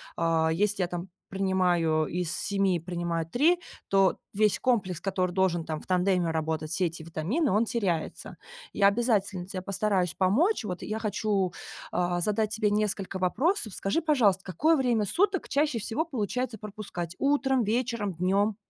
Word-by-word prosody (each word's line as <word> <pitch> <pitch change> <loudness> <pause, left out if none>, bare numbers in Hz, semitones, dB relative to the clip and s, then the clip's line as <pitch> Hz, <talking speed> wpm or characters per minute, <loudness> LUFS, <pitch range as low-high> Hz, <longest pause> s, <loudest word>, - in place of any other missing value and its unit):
а. 165 -1 +2
Если 205 -2 +2
я, - - 0
там, 175 +1 -5 0.2
принимаю 180 -5 +1
из 175 -1 -2
7 195 -3 +1
принимаю 170 -1 -3
3, 300 - +3 0.3
то 195 -1 +3 0.2
весь 210 -1 +2
комплекс, 190 -9 0
который 185 -2 -1
должен, 180 -3 +1
там, 155 -1 -3
в - - -16
тандеме 180 -2 +2
работать, 160 -1 -2
все 180 +1 +1
эти 160 0 -8
витамины, 175 - -1
он 215 +4 +3
теряется. 190 -9 -2 0.4
Я 200 -1 +4
обязательно 200 -4 +1
те 185 -1 -5
постараюсь 190 -2 0
помочь, 240 - +2
вот, 180 -3 -4
я 215 +1 -3
хочу, 205 -3 0 0.4
а, 175 0 0
задать 210 +2 +1
тебе 215 -1 +1
несколько 205 -2 -1
вопросов. 220 - 0
Скажи, 200 +12 -1
пожалуйста, 225 - +3
какое 310 - +2
время 240 -6 +1
суток 385 - +1
чаще 285 -4 +1
всего 255 - -2
получается 245 - -3
пропускать: 195 -5 -6
утром, 270 -3 +2
вечером, 225 -3 -1
днем? 195 +5 +1
195 Hz, 155 wpm, -28 LUFS, 180-225 Hz, 0.4 s, Я